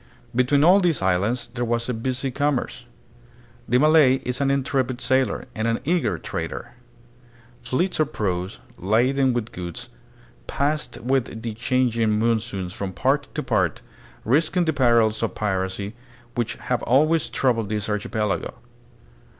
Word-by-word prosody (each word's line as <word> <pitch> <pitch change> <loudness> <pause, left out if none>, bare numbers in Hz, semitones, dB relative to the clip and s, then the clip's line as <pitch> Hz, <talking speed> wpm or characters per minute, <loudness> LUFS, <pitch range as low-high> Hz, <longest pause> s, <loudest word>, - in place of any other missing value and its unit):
Between 135 +3 +3
all 180 +5 +7
these 170 - +1
islands 100 +7 0
there 120 -1 -2
was 115 0 -1
a 125 - -1
busy 130 +3 -2
commerce. 145 0 -1 0.8
The 125 - +4
Malay 150 -2 +5
is 125 +2 -2
an 140 - +2
intrepid 135 -2 0
sailor, 130 -4 +1
and 110 +1 -2
an 115 0 0
eager 145 - +1
trader. 80 +9 -5 0.9
Fleets 130 +11 -1
of 155 -1 +1
praus, 95 -1 -2 0.2
laden 130 +7 +2
with 120 -2 -3
goods, 85 -2 -6 0.6
passed 150 +2 -1
with 120 -2 -1
the 115 -2 -3
chang 125 +2 +1
ing 110 -2 +1
monsoons 110 -5 -1
from 95 -1 -5
part 135 +10 +1
to 150 - -2
part, 105 - 0 0.4
risking 160 - +2
the 160 - +1
perils 115 -5 +3
of 115 - -2
piracy, 100 0 -2 0.4
which 120 -2 -2
have 125 -1 -2
always 155 +6 +2
troubled 115 -6 0
this 105 -1 -2
archipelago. 105 0 -2
120 Hz, 140 wpm, -23 LUFS, 105-135 Hz, 0.9 s, all